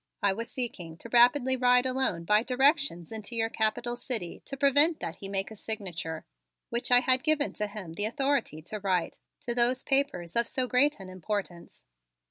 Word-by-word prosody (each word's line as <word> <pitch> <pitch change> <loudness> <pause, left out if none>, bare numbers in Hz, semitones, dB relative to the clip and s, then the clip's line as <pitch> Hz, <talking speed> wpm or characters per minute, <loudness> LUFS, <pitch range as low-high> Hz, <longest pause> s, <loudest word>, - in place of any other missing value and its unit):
I 200 -1 +3
was 230 +3 -5
seeking 180 -10 -5
to 235 - -9
rapidly 250 +2 +4
ride 250 0 +3
alone 255 -10 -1
by 210 +5 +3
directions 260 - +1
into 220 +1 -5
your 225 0 +1
Capital 220 +2 -1
city 240 -7 -3
to 275 - -7
prevent 290 +4 +4
that 165 - -6
he 195 - -8
make 195 +1 -2
a - - -9
signature, 180 -7 -5 0.5
which 235 +1 -2
I 245 0 +7
had 255 0 +3
given 310 -1 +1
to 210 - -3
him 205 -5 -8
the 205 +5 -1
authority 270 - -1
to 210 +6 -6
write, 185 -4 -2 0.2
to 240 - -2
those 245 +1 +2
papers 270 - -1
of 235 0 +2
so 255 -1 -1
great 280 +2 +3
an 185 -1 -10
importance. 185 -1 -6
235 Hz, 185 wpm, -28 LUFS, 195-260 Hz, 0.5 s, I